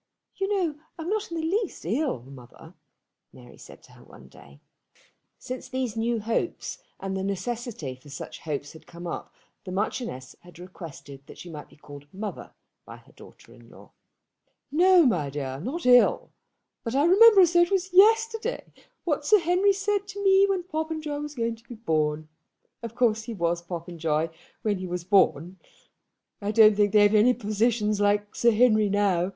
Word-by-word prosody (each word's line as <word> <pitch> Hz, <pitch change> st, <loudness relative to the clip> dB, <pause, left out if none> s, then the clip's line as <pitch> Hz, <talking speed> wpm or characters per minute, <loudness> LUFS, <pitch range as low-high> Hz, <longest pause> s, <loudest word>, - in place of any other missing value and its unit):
"You 390 Hz, -, -2 dB
know 345 Hz, -7 st, -1 dB, 0.2 s
I'm 330 Hz, +1 st, -5 dB
not 430 Hz, +1 st, -2 dB
the 335 Hz, -, -6 dB
least 340 Hz, -, -2 dB
ill, 230 Hz, -, -1 dB
mother," 125 Hz, -2 st, -14 dB, 0.6 s
Mary 125 Hz, -1 st, -16 dB
said -, -, -14 dB
to -, -, -19 dB
her -, -, -17 dB
one -, -, -16 dB
day. 70 Hz, 0 st, -17 dB, 0.8 s
Since 255 Hz, 0 st, -7 dB
these 255 Hz, -3 st, -3 dB
new 230 Hz, +1 st, -1 dB
hopes 230 Hz, -, -3 dB, 0.2 s
and 195 Hz, 0 st, -4 dB
the 190 Hz, -, -3 dB
necessity 200 Hz, -, -4 dB
for 130 Hz, +3 st, -17 dB
such 135 Hz, -, -8 dB
hopes 145 Hz, -2 st, -5 dB
had 160 Hz, -1 st, -16 dB
come 170 Hz, +1 st, -10 dB
up 170 Hz, -, -6 dB, 0.3 s
the 185 Hz, -, -8 dB
Marchioness 190 Hz, -, -4 dB
had 175 Hz, -1 st, -17 dB
requested 160 Hz, -6 st, -11 dB
that -, -, -13 dB
she 175 Hz, -, -10 dB
might 150 Hz, -2 st, -9 dB
be -, -, -20 dB
called 145 Hz, -1 st, -14 dB
mother 205 Hz, +2 st, -7 dB, 0.3 s
by -, -, -12 dB
her -, -, -21 dB
daughter -, -, -17 dB
in -, -, -18 dB
law. -, -, -17 dB, 0.8 s
"No, 355 Hz, +2 st, +5 dB
my 175 Hz, -, +1 dB
dear, 135 Hz, -2 st, -5 dB
not 270 Hz, -, -5 dB
ill; 245 Hz, -1 st, +4 dB, 0.5 s
but 230 Hz, +1 st, -4 dB
I 285 Hz, +2 st, +3 dB
remember 400 Hz, +3 st, +7 dB
as 350 Hz, -1 st, +4 dB
though 345 Hz, -, +5 dB
it 345 Hz, -, +3 dB
were 390 Hz, -, +3 dB, 0.2 s
yesterday 450 Hz, +4 st, +3 dB, 0.3 s
what 300 Hz, -4 st, -1 dB
Sir 425 Hz, +8 st, +5 dB
Henry 360 Hz, +3 st, +2 dB
said 400 Hz, 0 st, -1 dB
to 405 Hz, -1 st, -7 dB
me 390 Hz, 0 st, +5 dB
when 380 Hz, -2 st, 0 dB
Popenjoy 315 Hz, -3 st, -4 dB
was 295 Hz, 0 st, -7 dB
going 230 Hz, -2 st, -2 dB
to 230 Hz, +1 st, -25 dB
be 240 Hz, -, -8 dB
born. 155 Hz, -7 st, -1 dB, 0.5 s
Of 230 Hz, -1 st, -8 dB
course 225 Hz, -3 st, +1 dB
he 230 Hz, -1 st, -6 dB
was 170 Hz, -2 st, -1 dB
Popenjoy 165 Hz, -2 st, -3 dB, 0.3 s
when 205 Hz, -3 st, 0 dB
he 185 Hz, -, -5 dB
was 175 Hz, -1 st, -4 dB
born. 185 Hz, -2 st, +2 dB, 0.8 s
I 200 Hz, -, -3 dB
don't 215 Hz, -1 st, +6 dB
think 205 Hz, -1 st, +2 dB
they've 205 Hz, -1 st, +5 dB
any 220 Hz, +4 st, +5 dB
physicians 215 Hz, -1 st, 0 dB
like 205 Hz, 0 st, +1 dB
Sir 235 Hz, -, +3 dB
Henry 215 Hz, -2 st, +3 dB
now. 195 Hz, -3 st, +1 dB
220 Hz, 180 wpm, -26 LUFS, -, 0.8 s, remember